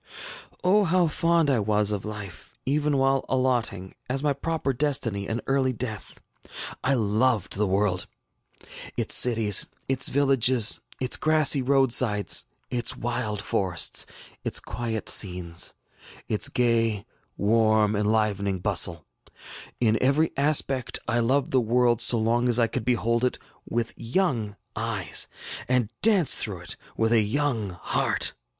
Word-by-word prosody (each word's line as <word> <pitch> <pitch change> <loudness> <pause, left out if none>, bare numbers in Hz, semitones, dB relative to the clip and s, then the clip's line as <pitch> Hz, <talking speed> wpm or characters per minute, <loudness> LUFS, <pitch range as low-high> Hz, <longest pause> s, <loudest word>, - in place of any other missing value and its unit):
ŌĆ£O, 195 +2 +3
how 180 0 +2
fond 165 +1 +1
I 135 -4 +2
was 105 0 +1
of 100 -2 -3
life, 105 -4 -9
even 145 +1 0
while 135 0 +1
allotting, 120 -8 -1 0.2
as 135 +2 -1
my 145 -1 +1
proper 145 -1 -2
destiny, 120 -8 -1
an 115 +2 -3
early 135 -1 +1
death! 110 -3 -6 0.6
I 135 +2 +3
loved 110 -2 0
the 105 +1 0
world, 95 -1 0 0.9
its - - +1
cities, 110 -5 +4 0.2
its 135 -1 +1
villages, 130 -4 +3 0.2
its 130 -1 0
grassy 155 -3 +4
roadsides, 125 -7 +2 0.3
its 125 +1 -2
wild 120 -4 -3
forests, 90 -4 0 0.4
its - - +1
quiet 115 -2 -5
scenes, 90 -3 +1 0.5
its 105 - +2
gay, 115 -4 +1 0.3
warm, 110 0 +2
enlivening 105 -2 0
bustle; 85 -4 +1 0.7
in 110 -2 +1
every 145 +5 +2
aspect, 140 -3 +1
I 120 0 0
loved 130 +4 0
the 130 - +3
world 120 0 +1
so 120 0 +4
long 120 +2 +1
as 120 - +3
I 115 - +4
could 115 0 -4
behold 115 -1 0
it 125 - 0 0.3
with 115 -1 -2
young 115 - -1 0.2
eyes 110 -5 0 0.4
and 125 -4 0
dance 200 - +4
through 95 -5 -2
it 90 - -5 0.2
with 115 0 +1
a 115 - +4
young 110 -5 -1
heart. - - 0
115 Hz, 135 wpm, -25 LUFS, 105-135 Hz, 0.9 s, cities